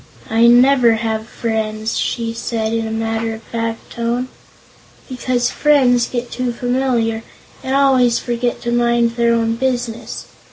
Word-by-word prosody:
"I 230 +1 +5
never 245 0 +5
have 220 0 -2
friends," 220 -1 -3
she 230 -1 -2
said 225 -1 -3
in 225 -1 -1
a - - -5
matter 225 0 -2
of 220 - -13
fact 230 0 -5
tone, 235 +2 -2 0.8
"because 250 -1 -1
friends 255 -5 +3
get 245 -1 -4
too 250 -1 -2
familiar 245 -2 0 0.4
and 265 +1 -1
always 260 -4 +4
forget 240 0 -2
to 235 - -2
mind 235 -1 +2
their 235 0 +2
own 230 0 0
business. 245 -2 -3
235 Hz, 145 wpm, -18 LUFS, 225-245 Hz, 0.8 s, I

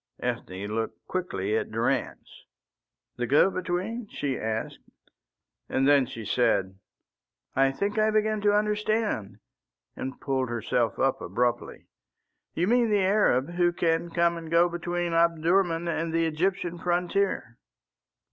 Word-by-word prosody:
Ethne 95 +2 -4
looked 110 +2 -4
quickly 190 - -2
at 445 -1 -1
Durrance. - - -2 0.7
"The - - -2
go 195 - +4
between?" 185 +6 -3
she 140 -2 -2
asked, 110 -1 -3 0.9
and 135 +1 +1
then 140 -3 +5
she 115 -4 -8
said, 100 -5 +1 0.8
"I 135 0 +4
think 200 +9 -2
I 215 0 +4
begin 215 0 +1
to 205 0 +3
understand," 210 - -1 0.6
and 130 +1 -6
pulled 130 -2 -1
herself 115 -1 -1
up 135 0 +1
abruptly. 120 +6 -2 0.7
"You 170 - +1
mean 235 +2 +3
the 205 -3 +2
Arab 180 -8 +2
who 175 0 +2
can 170 0 0
come 170 0 +1
and 165 -1 -8
go 170 +1 +4
between 175 0 -2
Omdurman 170 +1 +2
and 165 0 -1
the 165 0 +1
Egyptian 175 +2 -1
frontier?" 175 - -1
170 Hz, 130 wpm, -27 LUFS, 130-195 Hz, 0.9 s, then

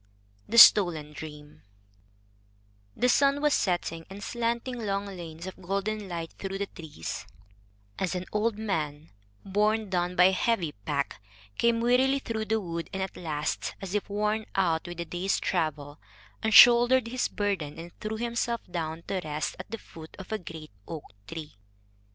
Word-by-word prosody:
THE - - 0
STOLEN 165 -9 +8
DREAM 150 -1 -10 1.4
The 250 - +3
sun 280 +3 +4
was 295 0 +2
setting, 170 -3 -1
and 200 +2 -8
slanting 235 +1 -2
long 200 -1 -1
lanes 170 -4 -8
of 190 0 -8
golden 200 +2 -2
light 165 -2 -4
through 195 0 -4
the 200 - -1
trees, 160 - -7 0.7
as 185 -1 -1
an 180 0 -3
old 210 +1 0
man, 160 -8 -3 0.3
borne 210 +1 +1
done 180 0 0
by 180 - +6
a 185 - +7
heavy 190 -4 +1
pack, 100 -3 -3 0.4
came 235 -1 +3
wearily 255 +3 +3
through 225 -5 -3
the 220 +1 +1
wood, 170 -4 -5
and 190 0 -2
at 190 - -6
last, 150 -3 -3
as 195 -1 -6
if 210 -1 -1
worn 210 +2 -1
out 170 -3 +1
with 175 0 -7
the 170 - -3
day's 180 +4 -1
travel, 150 -4 -2 0.4
unshouldered 240 +3 +7
his 255 +1 0
burden 190 -8 -2
and 170 +1 -8
threw 215 +1 -4
himself 235 0 -1
down 165 -1 -3
to 190 -2 -2
rest 150 0 -3
at 185 - -8
the 225 - -4
foot 160 -6 -13
of 190 - -10
a 220 - -1
great 160 -3 -9 0.2
oak 160 -3 -6 0.2
tree. 155 -8 -8
190 Hz, 165 wpm, -28 LUFS, 165-220 Hz, 1.4 s, STOLEN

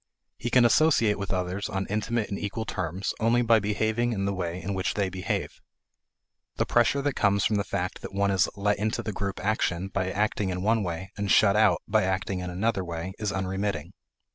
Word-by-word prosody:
He 120 - -2
can 125 0 +5
associate 115 -6 +4
with 100 - -4
others 95 +2 -2
on 95 -2 -2
intimate 110 +2 -1
and 100 - -2
equal 105 +2 -3
terms 95 -1 -3
only 115 +2 +3
by 115 -1 +5
behaving 110 +3 0
in 100 -2 -1
the 100 - 0
way 90 -1 -3
in 100 +2 -4
which 95 +2 -1
they 100 -2 0
behave. 95 0 -3 0.9
The - - 0
pressure 125 +4 +2
that 145 -1 0
comes 100 -3 +2
from 105 - +2
the 100 - +1
fact 90 -2 -3
that - - -7
one 100 0 +1
is 95 +1 +2
let 100 0 0
into 110 +1 -1
the 105 - -3
group 100 0 -3
action 95 -3 0
by 95 -1 -1
acting 105 0 0
in 90 0 -3
one 110 +2 +2
way 90 0 -4
and 100 -1 -2
shut 100 0 +5
out 105 -5 +3
by 110 +1 +3
acting 95 0 -1
in 90 0 -4
another 95 +2 0
way 85 +1 -5
is 105 -2 -1
unremitting. 95 -2 -2
100 Hz, 210 wpm, -27 LUFS, 95-110 Hz, 0.9 s, can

